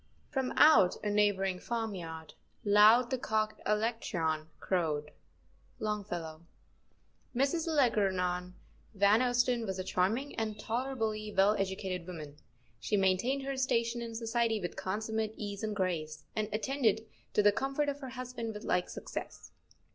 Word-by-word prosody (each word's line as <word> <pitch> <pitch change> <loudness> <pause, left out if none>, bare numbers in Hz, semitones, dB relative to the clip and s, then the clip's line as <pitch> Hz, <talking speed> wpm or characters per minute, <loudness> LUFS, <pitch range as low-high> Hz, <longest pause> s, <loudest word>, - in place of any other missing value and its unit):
" - - -34
From 265 -2 0
out 215 -13 +6
a 210 - 0
neighboring 195 -3 +2
farmyard 180 -10 -4 0.3
Loud 215 +5 +6
the 260 - 0
cock 215 -2 -1
Alectryon 210 -8 0
crowed." 155 -5 -1 0.7
—Longfellow. 175 -7 -4 0.9
Mrs. 280 +6 +1
Algernon 180 -7 +1 0.4
Van 200 +2 +5
Ousten 245 -1 +2
was 190 -1 -3
a 185 - -2
charming 215 +10 0
and 215 -2 -2
tolerably 225 -3 -2
well 200 +2 +4
educated 190 -2 -3
woman. 155 -5 -8 0.4
She 205 - 0
maintained 195 +9 +2
her 275 0 -3
station 235 -2 0
in 230 -1 -6
society 230 -1 0
with 175 -3 -5
consummate 220 +3 -2
ease 200 -2 -5
and 215 -1 -2
grace, 160 -5 -2
and 215 -1 -1
attended 220 0 +1 0.3
to 210 - +3
the 205 - +7
comfort 275 +6 -1
of 285 0 -2
her 265 -2 -7
husband 250 -3 -5
with 210 - -7
like 180 - 0
success. - - -7
215 Hz, 140 wpm, -32 LUFS, 185-235 Hz, 0.9 s, the